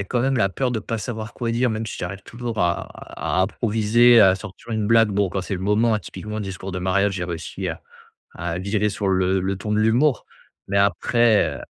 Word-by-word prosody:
a -, -, -8 dB
quand 120 Hz, +5 st, -1 dB
même 135 Hz, +1 st, +1 dB
la 100 Hz, -4 st, +2 dB
peur 125 Hz, +5 st, -1 dB
de 115 Hz, -, -1 dB
pas 115 Hz, +2 st, -4 dB
savoir 110 Hz, -2 st, -5 dB
quoi 120 Hz, -2 st, -3 dB
dire, 120 Hz, +1 st, +1 dB
même 110 Hz, +1 st, -3 dB
si -, -, -6 dB
j'arrive 95 Hz, +2 st, -5 dB
toujours 115 Hz, 0 st, -6 dB
à 85 Hz, -1 st, +1 dB
à 95 Hz, -, -4 dB
à -, -, +5 dB
improviser, 115 Hz, +3 st, +4 dB
à 95 Hz, -2 st, +6 dB
sortir 110 Hz, +3 st, -9 dB
une 105 Hz, -1 st, -1 dB
blague. 115 Hz, -1 st, +5 dB
Bon, 100 Hz, -2 st, 0 dB
quand 95 Hz, -, -2 dB
c'est 95 Hz, +2 st, -4 dB
le 90 Hz, -, -5 dB
moment, 105 Hz, +4 st, +2 dB
hein, 105 Hz, -, +1 dB
typiquement 105 Hz, +1 st, -7 dB
discours 95 Hz, -1 st, -6 dB
de 90 Hz, -, -3 dB
mariage, 100 Hz, +2 st, +1 dB
j'ai 90 Hz, -2 st, -3 dB
réussi 85 Hz, -2 st, -5 dB
à -, -, -5 dB, 0.6 s
à 85 Hz, 0 st, -3 dB
virer 100 Hz, +3 st, 0 dB
sur 100 Hz, -1 st, -2 dB
le 95 Hz, 0 st, +1 dB
le 95 Hz, +1 st, -2 dB
ton 105 Hz, +2 st, -3 dB
de 105 Hz, -, +2 dB
l'humour, 120 Hz, +6 st, +2 dB, 0.4 s
mais 100 Hz, -, +1 dB
après, 105 Hz, +4 st, +2 dB
heu. -, -, -8 dB
105 Hz, 235 wpm, -22 LUFS, 95-115 Hz, 0.6 s, à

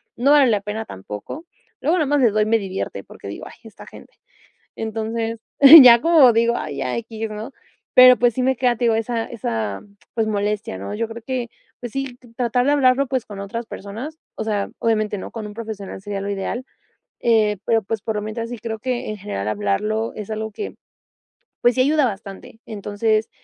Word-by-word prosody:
no 260 Hz, +4 st, +2 dB
vale 290 Hz, -3 st, +6 dB
la 210 Hz, -3 st, +2 dB
pena 210 Hz, +2 st, -4 dB
tampoco. 105 Hz, -, -8 dB, 0.3 s
Luego, 325 Hz, +6 st, +1 dB
nada 310 Hz, -4 st, +1 dB
más 290 Hz, 0 st, +2 dB
les 235 Hz, -5 st, +4 dB
doy 215 Hz, 0 st, +2 dB
me 225 Hz, +1 st, +3 dB
divierte, 195 Hz, -2 st, -5 dB
porque -, -, -12 dB
digo: -, -, -7 dB
"Ay, -, -, -12 dB
esta -, -, -13 dB
gente". -, -, -14 dB, 0.6 s
Entonces, 225 Hz, +1 st, -3 dB, 0.4 s
ya 235 Hz, -2 st, +9 dB
como 320 Hz, -6 st, +6 dB
digo; 235 Hz, +1 st, +2 dB
"Ay, 150 Hz, -2 st, -5 dB
ya 125 Hz, -2 st, -2 dB
equis", 225 Hz, -1 st, -5 dB
¿no?, 215 Hz, +5 st, -7 dB, 0.4 s
pero 255 Hz, -1 st, +9 dB
pues, 240 Hz, +1 st, +3 dB
sí 255 Hz, -, -1 dB
me 265 Hz, +1 st, +2 dB
queda, 245 Hz, -1 st, +1 dB
te 245 Hz, -, 0 dB
digo, 230 Hz, -1 st, +3 dB
esa 225 Hz, +1 st, -2 dB
esa 110 Hz, -, -4 dB, 0.3 s
pues, 225 Hz, -2 st, 0 dB
molestia 205 Hz, -, -2 dB
¿no?, 100 Hz, -, -6 dB
yo 230 Hz, +1 st, -2 dB
creo 230 Hz, +1 st, -8 dB
que, 250 Hz, -1 st, -3 dB, 0.3 s
pues 240 Hz, -2 st, -6 dB
sí, 270 Hz, -1 st, -4 dB, 0.2 s
tratar 245 Hz, 0 st, +1 dB
de 285 Hz, -, +3 dB
hablarlo 275 Hz, -1 st, +3 dB
pues, 260 Hz, -2 st, -2 dB
con 205 Hz, -2 st, -9 dB
otras 230 Hz, +4 st, -5 dB
personas, 225 Hz, +11 st, -8 dB, 0.2 s
o -, -, -4 dB
sea, 205 Hz, -2 st, -1 dB
obviamente, 215 Hz, -2 st, 0 dB
¿no?, -, -, -7 dB
con 225 Hz, -2 st, -6 dB
un 210 Hz, -, -9 dB
profesional 215 Hz, -4 st, -7 dB
sería 200 Hz, 0 st, -5 dB
lo 200 Hz, -, -4 dB
ideal, 200 Hz, +5 st, -3 dB, 0.6 s
eh, 220 Hz, -3 st, +3 dB
pero, 225 Hz, -1 st, +2 dB
pues, 215 Hz, +1 st, -4 dB
por 220 Hz, -2 st, -3 dB
lo -, -, -1 dB
mientras, 230 Hz, +2 st, -5 dB
sí 245 Hz, -, -6 dB
creo 220 Hz, 0 st, -5 dB
que, 250 Hz, 0 st, -3 dB
en 215 Hz, -, -4 dB
general, 145 Hz, -, -4 dB
hablarlo 105 Hz, -, -1 dB
es 210 Hz, -, -7 dB
algo 220 Hz, 0 st, -4 dB
que, 410 Hz, -, -6 dB, 0.9 s
pues, 240 Hz, 0 st, +4 dB
sí 255 Hz, -, +4 dB
ayuda 295 Hz, +1 st, +3 dB
bastante. 200 Hz, 0 st, -7 dB
Entonces, 215 Hz, 0 st, -1 dB
225 Hz, 200 wpm, -21 LUFS, 210-245 Hz, 0.9 s, ya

